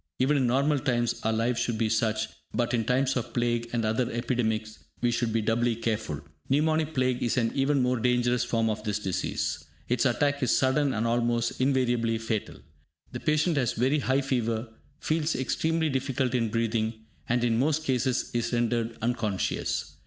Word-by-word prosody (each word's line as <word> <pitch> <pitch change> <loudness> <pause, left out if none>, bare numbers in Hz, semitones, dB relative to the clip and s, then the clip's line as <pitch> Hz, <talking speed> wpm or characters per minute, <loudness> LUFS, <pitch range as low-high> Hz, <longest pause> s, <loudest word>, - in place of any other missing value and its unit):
Even 135 +4 +2
in 130 -3 +2
normal 140 +4 +2
times 120 -4 0
our 110 - 0
lives 115 +2 0
should 120 -1 -1
be 110 0 +1
such, 110 0 +1 0.3
but, 120 0 0
in 115 -2 +1
times 130 +2 +1
of 120 -2 -4
plague 120 -1 0
and 115 -2 0
other 115 +3 0
epidemics, 110 -2 -1 0.2
we 120 0 +1
should 115 -1 0
be 115 0 0
doubly 115 +2 +1
careful. 110 -10 -2 0.3
Pneumonic 155 +2 +1
Plague 130 -1 +1
is 120 - 0
an 115 -2 +2
even 135 0 +2
more 125 -1 +1
dangerous 125 0 +2
form 115 -2 0
of 110 -1 -2
this 105 -2 -1
disease. 95 -4 -2 0.3
Its 125 +2 +2
attack 145 +3 +1
is 125 - +3
sudden 135 +2 +2
and 110 +2 0
almost 120 0 0
invariably 120 -4 +2
fatal. 110 -2 -3 0.6
The 120 - -5
patient 155 +3 +1
has 125 -5 +1
very 130 +6 +2
high 135 0 +1
fever, 115 -3 -1 0.3
feels 155 0 0
extreme 160 +5 0
difficulty 130 -1 0
in 115 -1 0
breathing, 110 0 -1 0.2
and 120 0 +2
in 115 -1 +2
most 155 +3 +1
cases, 130 -2 0
is 120 -1 -1
rendered 120 -1 0
unconscious. 115 -5 -1
120 Hz, 175 wpm, -27 LUFS, 115-130 Hz, 0.6 s, is